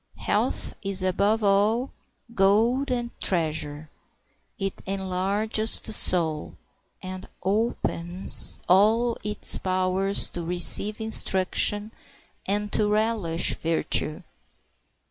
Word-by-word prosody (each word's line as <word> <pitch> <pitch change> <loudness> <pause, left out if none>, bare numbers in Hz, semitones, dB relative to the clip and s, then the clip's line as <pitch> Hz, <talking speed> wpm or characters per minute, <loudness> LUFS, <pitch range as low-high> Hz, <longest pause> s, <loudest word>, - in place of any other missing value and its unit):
Health - - -2
is 195 -2 -1
above 200 +4 0
all 210 +6 +1 0.4
gold 230 +7 +2
and 240 -1 -3
treasure. 155 -3 -1 0.7
It 195 -3 -5
enlarges 195 +3 0
the 220 - -4
soul, 160 -7 0 0.5
and 185 0 -8 0.2
opens 190 -3 +3
all 220 +6 +3
its 210 0 -1
powers 185 +1 -1
to 175 - -6
receive 180 +5 -1
instruction 210 0 0 0.6
and 205 +1 -2
to 210 - +1
relish 210 -6 0
virtue. 160 -1 0
195 Hz, 90 wpm, -24 LUFS, 185-215 Hz, 0.7 s, opens